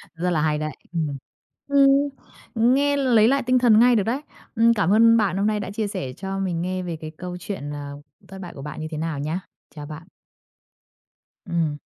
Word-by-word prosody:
Rất 175 +2 -1
là 165 -4 +1
hay 150 -1 +1
đấy, 155 0 -3 0.2
ừm. 155 -4 -2 0.5
Ừm, 280 0 +4 0.5
nghe 270 +5 +3
lấy 240 -6 +4
lại 275 +2 +2
tinh 255 +1 +3
thần 230 -3 +5
ngay 245 +1 +6
được 210 - +2
đấy! 245 +7 -2 0.3
Ưm, 230 +1 +5
cảm 200 -4 +2
ơn 230 +1 +6
bạn 195 -4 +1
hôm 200 +2 +1
nay 215 -1 0
đã 200 -1 -5
chia 210 +1 -2
sẻ 185 - -5
cho 195 0 -4
mình 180 -3 -2
nghe 185 +1 -2
về 175 -2 -4
cái 155 0 -6
câu 180 -1 -6
chuyện, 175 -6 -5
à, 145 -1 -6 0.4
thất 190 0 -10
bại 180 - -8
của 135 - -10
bạn 150 +1 -7
như 155 - -4
thế 155 - -4
nào 160 -2 -3
nhá, 155 +5 -2 0.4
chào 150 -1 -7
bạn. 155 +2 -9 1.4
Ừm. 165 -4 -1
190 Hz, 210 wpm, -23 LUFS, 160-230 Hz, 1.4 s, ngay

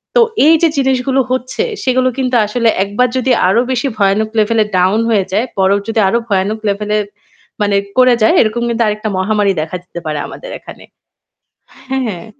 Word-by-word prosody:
তো 485 - +6 0.2
এইযে 325 +1 +5
জিনিসগুলো 265 0 +1
হচ্ছে 255 0 -2 0.2
সেগুলো 255 0 +2
কিন্তু 255 -1 -1
আসলে 230 +2 +1
একবার 205 +6 0
যদি 255 0 0 0.2
আরও 210 +6 +3
বেশি 255 +2 -1
ভয়ানক 205 +2 +1
level 220 +1 +1
এ - - -7
down 190 +5 +2
হয়ে 205 -4 +2
যায় 215 +6 +1
বরফ 195 +1 +2
যদি 225 0 -1
আরও 230 +5 +1
ভয়ানক 200 +2 0
level 210 +1 -5
এ - - +1 0.6
মানে 205 -1 +1 0.2
করে 255 -1 +5
যায়, 220 - +4
এরকম 235 +2 -1
কিন্তু 235 0 0
আরেকটা 215 +1 -2
মহামারী 205 0 +1
দেখা 165 +4 -4
দিতে 175 -1 -9
পারে 150 -1 -3
আমাদের - - -10
এখানে - - -13 1.1
হ্যাঁ। 230 -8 -3
220 Hz, 175 wpm, -14 LUFS, 200-255 Hz, 1.1 s, তো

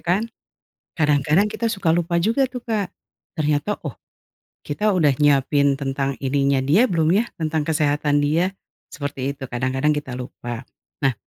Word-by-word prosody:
kan? 180 +5 +1 0.8
Kadang-kadang 150 +4 +3
kita 225 +1 -1
suka 195 -7 +1
lupa 170 0 0
juga 230 +9 +2
tuh 250 - -6
Kak, 215 -5 -1 0.5
ternyata, 150 +6 0
oh, 135 - -6 0.7
kita 210 +9 0
udah 155 -6 +3
nyiapin 140 -1 +3
tentang 135 0 -2
ininya 140 0 +2
dia 165 - +4
belum 165 -1 +2
ya, 215 +5 +3
tentang 155 -1 -1
kesehatan 150 -2 +1
dia, 170 +6 +1 0.3
seperti 140 -3 -4
itu, 135 - -6
kadang-kadang 130 +4 0
kita 135 -4 -4
lupa. 120 -1 -7 0.4
Nah, 135 - +3
150 Hz, 145 wpm, -22 LUFS, 140-175 Hz, 0.8 s, dia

